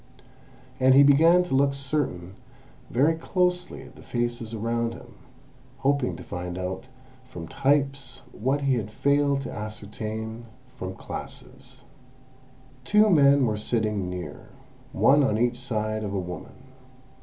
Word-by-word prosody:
And 130 0 +5
he 140 - +8
began 165 +6 +6
to 180 - -5
look 140 +1 +3 1.1
very 140 +7 +3
closely 180 +2 -1
at - - -15
the - - -14
faces 120 -2 -3
around 115 +1 -2
him, 120 -1 -13 0.6
hoping 140 -2 +1
to - - -9
find 90 0 -5
out 95 +4 -4 0.4
from 85 -9 -9
types 135 - 0
what 135 +6 -1
he 135 -2 +2
had 110 -2 -3
failed 140 +3 +1
to - - -6
ascertain 110 +2 -6 0.3
from 95 -3 -6
classes. - - -9 1.0
Two 210 +7 +4
men 140 -4 +5
were 110 -2 0
sitting 105 -3 -1
near, 90 -5 -7 0.4
one 145 +2 +4
on 110 -5 +1
each 120 +1 +1
side 110 -4 -2
of 100 -1 -3
a - - 0
woman. 90 +7 -8
120 Hz, 130 wpm, -26 LUFS, 105-140 Hz, 1.1 s, he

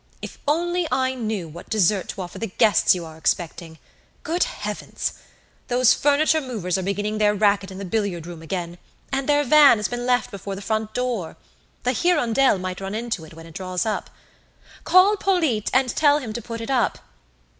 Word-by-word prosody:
If - - -9
only 345 +3 +1
I 260 0 +1
knew 220 -8 -3
what 165 +3 -11
dessert 205 -2 +2
to 190 - -4
offer 175 - -9
the 225 - -2
guests 205 -1 +3
you 175 -2 -5
are 160 0 -11
expecting! 165 -1 -2 0.5
Good 345 +3 +1
heavens! - - -4 0.5
Those 250 0 +4
furniture 305 +2 +2
movers 215 - -3
are 190 - 0
beginning 205 +3 -2
their 210 0 +3
racket 200 -2 +2
in 190 - -9
the 200 - -6
billiard 190 -4 -2
room 170 -2 -9
again; 175 +1 -5 0.3
and 270 +1 -1
their 290 0 +4
van 290 -2 +7
has 210 -2 -1
been 245 0 -4
left 250 0 +1
before 200 0 -6
the 195 - -8
front 220 0 -2
door! 245 -9 -2 0.5
The 250 - +2
'Hirondelle' 270 - +2
might 185 0 -5
run 195 +2 -4
into 225 -7 -3
it 155 - -14
when 165 0 -11
it 165 - -13
draws 185 +1 -3
up. 215 - -2 0.8
Call 385 +3 +5
Polyte 320 - +1
and 260 0 +2
tell 290 -1 +4
him 245 -7 -5
to 235 - -4
put 230 +1 -7
it 230 - -4
up. 245 -6 +1
215 Hz, 190 wpm, -23 LUFS, 185-260 Hz, 0.8 s, van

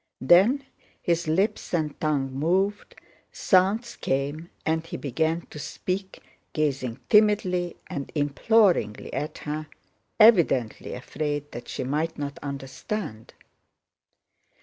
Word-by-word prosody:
Then 195 - +5 0.4
his 170 -1 0
lips 185 +3 0
and 155 -3 -2
tongue 145 -4 0
moved, 185 +8 0 0.4
sounds 205 +6 +2
came, 145 +5 -2 0.2
and 160 0 +1
he 165 - -6
began 160 +5 -1
to 150 - -8
speak, 190 +5 -4 0.3
gazing 135 -5 -1
timidly 190 -5 +3
and 140 -1 -6
imploringly 145 - +2
at 150 +1 -3
her, 155 +1 -3 0.5
evidently 170 - +4
afraid 145 +3 -4
that 120 - -8
she - - -4
might 150 +5 -1
not 145 +2 -5
understand. 140 - -5
155 Hz, 105 wpm, -26 LUFS, 140-185 Hz, 0.5 s, Then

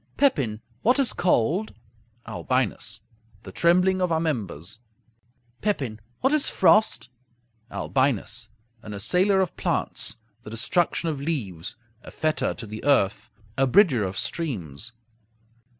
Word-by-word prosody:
Pepin 135 - +2 0.2
What 245 +4 +4
is 275 -3 +2
cold? 175 - +1 0.5
Albinus 110 -4 -1 0.4
The - - -9
trembling 180 +2 +3
of 180 -2 +1
our 160 - +2
members. 110 - -3 0.8
Pepin 135 - -1 0.2
What 265 +3 +3
is 305 -2 +4
frost? 125 - +3 0.6
Albinus 120 -4 -1 0.3
An 105 -3 -7
assailer 180 - +2
of 185 - -2
plants; - - 0 0.3
the 110 - -10
destruction 165 +9 0
of 145 -3 -3
leaves; 110 - -3 0.3
a - - -11
fetter 155 -1 -1
to 115 - -7
the 110 0 -8
earth; 120 -5 +2 0.3
a 135 +2 +3
bridger 155 - +5
of 95 0 -3
streams. 115 - -2
135 Hz, 120 wpm, -25 LUFS, 110-180 Hz, 0.8 s, bridger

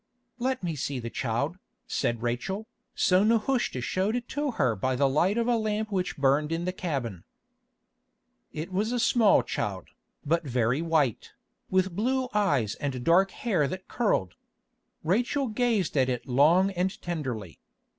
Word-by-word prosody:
"Let 255 -2 -1
me 170 -3 -2
see 140 -1 -3
the 115 -1 -5
child," 140 +9 -2 0.3
said 120 -1 -1
Rachel. 190 - -2 0.3
So 185 +1 +4
Nehushta 230 - +1
showed 190 - 0
it 245 0 -3
to 290 +1 -1
her 125 - +1
by 130 +6 -1
the 140 +2 +3
light 175 - +2
of 235 - +1
a 240 - +3
lamp 215 0 -2
which 185 -2 -1
burned 145 +2 +2
in 165 +1 -1
the 185 - 0
cabin. 130 - -4 1.3
It 160 +5 -6
was 210 +5 0
a 245 - 0
small 225 -3 +4
child, 100 -5 -4 0.4
but 165 +3 +1
very 125 0 0
white, 160 -8 0 0.4
with 185 -1 +1
blue 255 +5 0
eyes 145 - +2
and 130 -2 -4
dark 180 +5 +4
hair 190 - 0
that 185 +5 -6
curled. 205 - 0 0.7
Rachel 245 - +1
gazed 220 -6 0
at 130 -2 +3
it 125 +1 -3
long 160 +9 +4
and 185 +1 -2
tenderly. 130 - -4
175 Hz, 155 wpm, -27 LUFS, 130-210 Hz, 1.3 s, So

